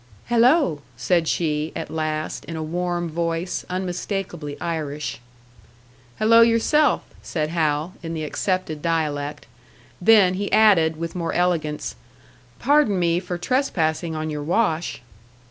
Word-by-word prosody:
"Hello," 240 - +4 0.2
said 165 +7 +1
she, 155 -2 0
at - - -5
last, 155 -1 -3
in 165 - -6
a 160 - -3
warm 175 +1 -2
voice, 165 +2 -2
unmistakably 180 -4 -4
Irish. 150 -3 -3 1.0
"Hello 230 +2 +6
yourself," 235 +5 +3 0.2
said 155 -2 -2
Hal, 155 0 0
in 165 -1 -5
the 155 - -3
accepted 160 0 -2
dialect; 150 -3 -2 0.6
then 200 -2 +6
he 200 +2 -3
added, 180 -8 +5
with 165 0 -4
more 170 -2 -3
elegance, 160 - -1 0.6
"Pardon 285 -7 +3
me 170 -1 +2
for 180 -1 -5
trespassing 170 - 0
on 155 0 -3
your 150 -1 -4
wash." 165 - 0
170 Hz, 125 wpm, -23 LUFS, 155-185 Hz, 1.0 s, Hello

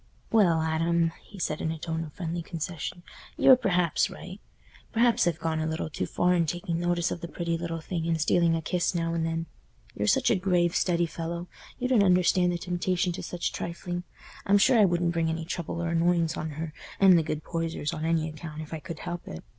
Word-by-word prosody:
"Well, 175 -8 +4
Adam," 165 +1 +1
he 205 - -14
said, 155 -4 -2
in - - -1
a 160 - -4
tone 160 +1 -3
of 150 -2 -9
friendly 170 -2 -3
concession, 170 +1 -5 0.3
"you're 260 - +8
perhaps 180 -8 +1
right. 185 +3 -9 0.5
Perhaps 235 -3 +3
I've 170 -2 +1
gone 160 -1 -1
a 155 - -1
little 160 0 -3
too - - -3
far 180 0 +2
in 170 -2 +2
taking 175 +1 -2
notice 175 0 0
of 175 - -4
the 170 - -4
pretty 170 0 -2
little 165 -1 -4
thing 165 0 -3
and 165 -1 +1
stealing 165 +1 +3
a 165 - -3
kiss 180 +2 0
now 165 -1 0
and 165 -1 0
then. 165 0 -1 0.5
You're 105 - -2
such - - +3
a - - +4
grave, 180 -2 +1
steady 175 -1 +2
fellow, 170 +1 -5 0.3
you 250 - -1
don't 250 -5 +4
understand 180 -1 +4
the 175 - -1
temptation 180 +1 -1
to 170 - -5
such 175 -1 -3
trifling. 175 +1 -4 0.5
I'm 200 +1 +6
sure 235 +4 +5
I 210 - +7
wouldn't 175 -1 +1
bring 165 -1 +1
any 160 0 -3
trouble 170 0 -4
or 170 - -1
annoyance 170 -1 +2
on 155 - -3
her 160 -1 -4 0.3
and 190 -2 +7
the 170 - +5
good 155 -1 -3
Poysers 165 -3 -3
on 155 - -4
any 160 -1 +1
account 155 0 -7
if 155 - -10
I 160 - -3
could 160 +2 -8
help 175 0 -5
it. 80 - -7
170 Hz, 220 wpm, -27 LUFS, 160-180 Hz, 0.5 s, you're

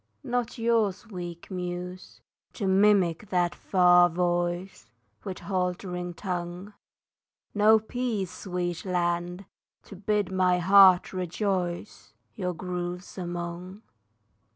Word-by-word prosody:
Not 245 -2 -2
yours, 225 -4 +1
weak 175 -4 -8
Muse, 180 0 -6 0.3
to 205 - -4
mimic 190 -1 +3
that 175 -1 +1
far 180 -2 +5
voice, 175 - -2 0.3
With 190 -2 -5
halting 180 -2 -3
tongue; 180 +2 -5 0.8
No 215 +1 +6
peace, 220 -4 -3
sweet 175 -2 -3
land, 175 0 -1 0.4
to 200 - -12
bid 205 0 -1
my 185 -1 +3
heart 190 0 +6
rejoice 185 0 -3 0.2
Your 180 -3 -3
groves 180 0 -5
among. 175 +2 -6
180 Hz, 100 wpm, -27 LUFS, 175-200 Hz, 0.8 s, No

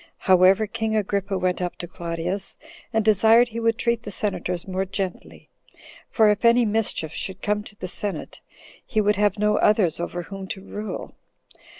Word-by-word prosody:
However, 185 +3 +5
king 220 0 -2
Agrippa 200 -1 -1
went 180 0 0
up 180 -1 -2
to 175 - -7
Claudius, 170 +2 -4 0.3
and 220 -2 +1
desired 220 +3 +5
he 230 +1 -5
would 230 -1 +1
treat 235 -1 0
the 220 - -7
senators 185 -3 -3
more 190 0 -1
gently; 195 -1 -5 0.6
for 215 -2 +4
if 210 +2 -2
any 235 +1 +5
mischief 210 -7 -1
should 190 -1 -5
come 210 0 0
to 210 - -13
the 185 - -6
senate, 200 +2 -4 0.4
he 220 - -1
would 210 -1 +2
have 205 0 +2
no 210 0 +2
others 200 -7 +3
over 175 0 -4
whom 195 +2 -8
to 190 - -5
rule. 210 +1 -6
205 Hz, 175 wpm, -24 LUFS, 185-220 Hz, 0.6 s, However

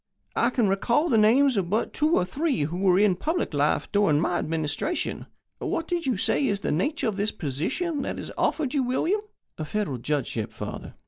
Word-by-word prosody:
I 235 - +3
can 245 -4 +1
recall 235 - +1
the 230 - +3
names 245 +4 +4
of 180 -3 0
but 215 +4 0
two 310 +2 +2
or 180 - +2
three 280 - -1
who 160 +4 -3
were 185 -1 +3
in 200 -2 +4
public 320 - -2
life 145 0 +1
during 200 -8 +3
My 175 +2 0
Administration. 160 - -2 0.3
What 330 - -2
did 345 -4 -2
you 250 -6 +1
say 270 +8 +2
is 200 -3 -1
the - - -1
nature 245 - 0
of 210 -3 -2
this 210 +1 0
position 265 - -2
that - - -4
is - - -6
offered 300 -5 0
you, 285 - +2
William?" 320 +11 0 0.4
"A - - -2
Federal 155 -6 -2
Judgeship, 120 -5 -2
father. - - -7
210 Hz, 200 wpm, -26 LUFS, 170-280 Hz, 0.4 s, names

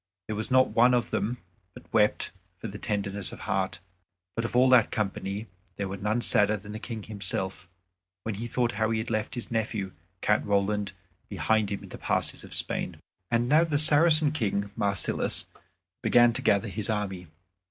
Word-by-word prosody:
There 110 - -4
was 110 +1 -3
not 130 0 +4
one 125 +2 +4
of 120 - -1
them 120 +4 -1 0.4
but - - -11
wept 105 -2 +2 0.3
for 115 - -6
very 105 0 -8
tenderness 100 -2 -3
of - - -10
heart. 95 -4 -1 0.6
But 115 - -1
of 115 - -4
all 125 +1 +6
that 125 -4 +6
company 100 0 -3 0.3
there 100 - -3
was 95 0 -6
none 105 +4 0
sadder 105 -2 +4
than 105 +1 -10
the 110 - -6
King 110 -2 -6
himself, 95 -3 -3 0.5
when 110 - -2
he 115 +4 -5
thought 120 0 0
how 110 0 0
he 115 - 0
had 110 +2 -3
left 110 +3 -2
his 120 - -6
nephew 110 -4 -2 0.3
Count 105 - +2
Roland 100 0 0 0.4
behind 110 -2 +1
him 100 - -4
in - - -11
the - - -9
passes - - -1
of - - -8
Spain. - - -1 0.3
And 120 0 +1
now 155 +5 +5
the 155 -4 0
Saracen 155 0 +6
King 100 -8 -1
Marsilas 100 -1 0 0.6
began 120 -1 +5
to - - -2
gather 105 +1 +2
his 105 +4 -4
army. 95 -4 -2
110 Hz, 185 wpm, -27 LUFS, 100-120 Hz, 0.6 s, all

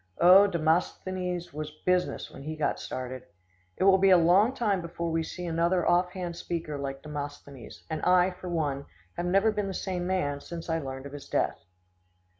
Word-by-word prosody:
Oh, 185 +4 +8
Demosthenes 180 +1 -1
was 155 0 -4 0.2
business 180 0 0
when 135 - -11
he 155 +3 -5
got 155 -2 -1
started. 130 0 -5 0.6
It - - 0
will 190 0 +6
be 195 +1 +5
a 185 - +8
long 180 +7 +5
time 205 -6 +1
before 170 0 -4
we 165 0 +1
see 180 +2 -6
another 170 +2 +1
off 180 +1 +3
hand 175 -2 -4
speaker 165 -3 -4
like 135 0 -5
Demosthenes, 145 -3 -8
and 160 -2 -4
I, 180 0 +4
for 180 0 -8
one, 145 -5 -2 0.3
have 175 - -2
never 195 +4 +3
been 210 -2 -2
the 190 - -4
same 180 -2 -3
man 160 -7 0
since 170 +1 -6
I 165 - +1
learned 135 -2 -6
of 140 - -9
his 145 - -9
death. - - 0
170 Hz, 190 wpm, -28 LUFS, 150-185 Hz, 0.6 s, Oh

